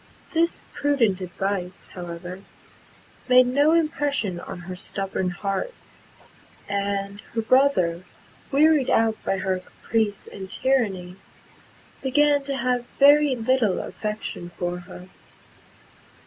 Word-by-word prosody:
This 335 Hz, +1 st, +1 dB
prudent 235 Hz, -10 st, +1 dB
advice, 185 Hz, 0 st, -4 dB
however, 175 Hz, +1 st, -7 dB, 0.9 s
made 255 Hz, 0 st, +7 dB
no 285 Hz, +5 st, +3 dB
impression 290 Hz, -, 0 dB
on 180 Hz, -, -8 dB
her 185 Hz, +1 st, -7 dB
stubborn 190 Hz, 0 st, -2 dB
heart; 195 Hz, -, -3 dB, 0.9 s
and 200 Hz, 0 st, -2 dB
her 225 Hz, -, +1 dB
brother, 220 Hz, -10 st, +3 dB, 0.5 s
wearied 295 Hz, -1 st, +4 dB
out 225 Hz, -1 st, +2 dB
by 195 Hz, -, 0 dB
her 190 Hz, -1 st, -1 dB
caprice 205 Hz, +2 st, -2 dB
and 190 Hz, -1 st, -9 dB
tyranny, 195 Hz, -8 st, 0 dB, 0.8 s
began 285 Hz, +2 st, +3 dB
to 275 Hz, -1 st, -2 dB
have 245 Hz, 0 st, 0 dB
very 290 Hz, 0 st, +6 dB
little 230 Hz, -4 st, +1 dB
affection 210 Hz, -5 st, -5 dB
for 175 Hz, 0 st, -2 dB
her. 180 Hz, +1 st, -11 dB
210 Hz, 105 wpm, -24 LUFS, 185-270 Hz, 0.9 s, made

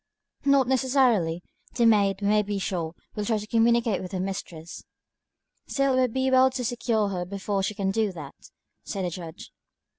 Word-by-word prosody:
"Not 275 Hz, -2 st, +4 dB
necessarily. 250 Hz, -10 st, +2 dB, 0.3 s
The 235 Hz, -, +3 dB
maid, 200 Hz, -3 st, +3 dB
we -, -, +1 dB
may 210 Hz, +1 st, +4 dB
be 205 Hz, 0 st, -3 dB
sure, 175 Hz, -4 st, -3 dB, 0.2 s
will 210 Hz, -, -3 dB
try 220 Hz, +1 st, 0 dB
to 210 Hz, -, -5 dB
communicate 230 Hz, -1 st, +2 dB
with 185 Hz, +1 st, -8 dB
her 185 Hz, -, -2 dB
mistress." 175 Hz, -3 st, -6 dB, 0.8 s
"Still, 275 Hz, -1 st, +1 dB
it -, -, +1 dB
would 250 Hz, -2 st, +1 dB
be 265 Hz, 0 st, 0 dB
well 260 Hz, 0 st, +6 dB
to 255 Hz, -1 st, -4 dB
secure 230 Hz, -3 st, 0 dB
her 180 Hz, -2 st, -3 dB
before 195 Hz, +2 st, -3 dB
she 200 Hz, +2 st, -2 dB
can 195 Hz, -2 st, -1 dB
do 215 Hz, 0 st, 0 dB
that," 150 Hz, -5 st, -9 dB, 0.5 s
said 195 Hz, -3 st, -4 dB
the 175 Hz, -, -2 dB
Judge. 165 Hz, -2 st, -9 dB
210 Hz, 185 wpm, -26 LUFS, 190-240 Hz, 0.8 s, well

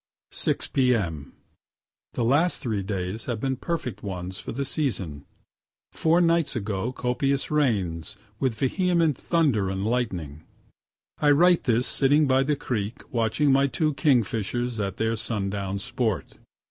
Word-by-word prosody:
6 -, -, -1 dB
p.m. 100 Hz, -, 0 dB, 0.8 s
The 120 Hz, -, -1 dB
last 150 Hz, +9 st, +3 dB
three 110 Hz, -8 st, -2 dB
days 95 Hz, +2 st, -4 dB
have 120 Hz, -3 st, -3 dB
been 135 Hz, +2 st, -1 dB
perfect 130 Hz, -, -4 dB
ones 95 Hz, 0 st, -5 dB
for -, -, -6 dB
the 140 Hz, +4 st, -3 dB
season, 95 Hz, -, -2 dB, 0.7 s
(four 165 Hz, +2 st, +2 dB
nights 170 Hz, -4 st, +2 dB
ago 105 Hz, +1 st, -2 dB
copious 130 Hz, +3 st, -1 dB
rains, 100 Hz, -, 0 dB, 0.2 s
with 130 Hz, -4 st, 0 dB
vehement 165 Hz, -, +1 dB
thunder 135 Hz, -, +1 dB
and 95 Hz, +1 st, -2 dB
lightning.) 95 Hz, -, -2 dB, 0.8 s
I 150 Hz, -, +3 dB
write 175 Hz, +4 st, +5 dB
this 120 Hz, 0 st, +2 dB
sitting 145 Hz, +2 st, +3 dB
by 130 Hz, -1 st, +3 dB
the 145 Hz, +2 st, +1 dB
creek 115 Hz, -6 st, -4 dB
watching 115 Hz, +5 st, +2 dB
my 135 Hz, +1 st, +4 dB
two 150 Hz, +4 st, 0 dB
kingfishers 120 Hz, -, 0 dB
at 95 Hz, -2 st, -2 dB
their 110 Hz, 0 st, 0 dB
sundown 100 Hz, -3 st, -2 dB
sport. 110 Hz, 0 st, -2 dB
120 Hz, 135 wpm, -25 LUFS, 100-140 Hz, 0.8 s, write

